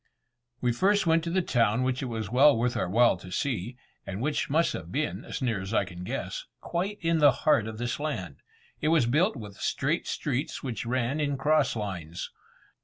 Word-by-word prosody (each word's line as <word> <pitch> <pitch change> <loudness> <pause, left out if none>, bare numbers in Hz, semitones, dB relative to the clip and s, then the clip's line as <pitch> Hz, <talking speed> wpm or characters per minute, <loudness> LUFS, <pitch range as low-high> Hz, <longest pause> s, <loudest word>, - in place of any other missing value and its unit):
We 125 - +2
first 200 - +2
went 165 0 +3
to 170 +2 -1
a 185 - +3
town 115 -4 +2
which 130 0 0
it 130 - -2
was 110 -3 -4
well 135 +2 +6
worth 120 +2 0
our 115 - -1
while 115 0 +4
to 90 +1 -11
see, 120 +1 -2 0.3
and 100 0 -5
which 145 +5 -1
must 160 +4 +2
have 85 -1 -7
been, 145 +6 -2
as - - -5
near 115 -6 0
as 95 +4 -4
I - - +3
can 90 -1 -9
guess, - - -4
quite 195 +4 -2
in 165 -1 +2
the 145 -2 +7
heart 110 -8 +4
of 110 -1 -6
this 120 +2 -2
land. 95 - -4 0.4
It 150 - 0
was 155 -5 +4
built 155 - +2
with 105 -5 -9
straight - - -1
streets - - -2
which 120 -2 -4
ran 130 +4 0
in 145 -2 0
cross 150 -1 +2
lines. 90 -6 -5
125 Hz, 205 wpm, -28 LUFS, 110-150 Hz, 0.4 s, the